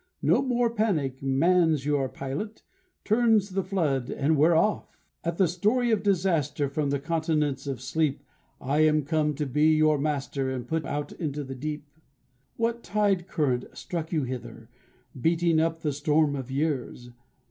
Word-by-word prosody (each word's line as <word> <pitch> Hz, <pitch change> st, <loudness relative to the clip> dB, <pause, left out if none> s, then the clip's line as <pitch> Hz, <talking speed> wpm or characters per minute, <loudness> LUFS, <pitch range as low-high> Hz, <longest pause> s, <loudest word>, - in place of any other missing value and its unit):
No -, -, +4 dB
more 245 Hz, -3 st, +1 dB
panic; 165 Hz, -, -1 dB
Man's 155 Hz, +2 st, +2 dB
your 145 Hz, -3 st, +1 dB
pilot; 145 Hz, +14 st, -6 dB, 0.4 s
Turns 220 Hz, -3 st, +3 dB
the 195 Hz, +1 st, 0 dB
flood, 160 Hz, -10 st, -1 dB
and 150 Hz, +3 st, +1 dB
we 150 Hz, +2 st, +5 dB
are 170 Hz, -, +3 dB
off! 210 Hz, +6 st, 0 dB, 0.3 s
At 170 Hz, 0 st, -2 dB
the 190 Hz, -, +4 dB
story 215 Hz, +8 st, +1 dB
of 215 Hz, -3 st, +2 dB
disaster, 170 Hz, -8 st, +1 dB
From 145 Hz, 0 st, -1 dB
the 140 Hz, -, +1 dB
continents 150 Hz, -2 st, -1 dB
of 135 Hz, -3 st, -3 dB
sleep, 140 Hz, +2 st, -1 dB, 0.4 s
I 140 Hz, +4 st, -1 dB
am 155 Hz, -1 st, +4 dB
come 150 Hz, 0 st, 0 dB
to 150 Hz, +1 st, -2 dB
be 150 Hz, +4 st, +3 dB
your 155 Hz, -1 st, +3 dB
master 140 Hz, -2 st, -2 dB
And 125 Hz, -2 st, -4 dB
put 160 Hz, -1 st, -2 dB
out 145 Hz, 0 st, -3 dB
into 150 Hz, -3 st, -4 dB
the 135 Hz, -1 st, -7 dB
deep. 150 Hz, +3 st, -5 dB, 0.7 s
What 235 Hz, +1 st, -1 dB
tide 200 Hz, -5 st, 0 dB
current 135 Hz, -9 st, 0 dB
struck 165 Hz, -2 st, -5 dB
you 155 Hz, -4 st, 0 dB
hither, 120 Hz, -3 st, -7 dB, 0.5 s
Beating 165 Hz, +1 st, +2 dB
up 165 Hz, 0 st, 0 dB
the 150 Hz, -3 st, -1 dB
storm 150 Hz, 0 st, +2 dB
of 135 Hz, -2 st, -6 dB
years? 135 Hz, -4 st, -2 dB
155 Hz, 165 wpm, -27 LUFS, 140-175 Hz, 0.7 s, we